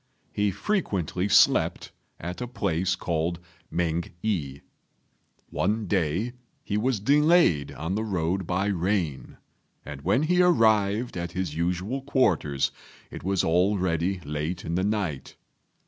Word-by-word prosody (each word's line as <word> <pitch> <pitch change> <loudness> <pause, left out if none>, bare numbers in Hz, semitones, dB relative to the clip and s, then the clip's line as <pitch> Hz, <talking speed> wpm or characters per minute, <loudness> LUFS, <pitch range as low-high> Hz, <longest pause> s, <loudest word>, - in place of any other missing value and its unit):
He 105 0 +1
frequently 100 - -1
slept 100 - +3 0.3
at 90 +7 -6
a 125 - -3
place 95 -6 -1
called 85 -1 -1 0.3
Mêng 85 -1 -1
i. 70 -10 -2 0.9
One 105 +4 0
day 95 +5 0 0.3
he 100 - -3
was 115 +1 +1
delayed 145 - +4
on 80 +6 -4
the 110 +2 -1
road 95 -3 -1
by 95 +2 0
rain, 90 -6 -1 0.5
and 70 -2 -8
when 100 - +2
he 180 +3 +3
arrived 110 - +3
at 85 0 -4
his 90 -5 -2
usual 90 +10 -1
quarters 90 - +1 0.4
it - - -8
was 95 0 +1
already 90 0 +1
late 75 +4 -4
in 85 - -3
the 90 +2 +1
night. 100 -10 -2
95 Hz, 130 wpm, -26 LUFS, 85-105 Hz, 0.9 s, delayed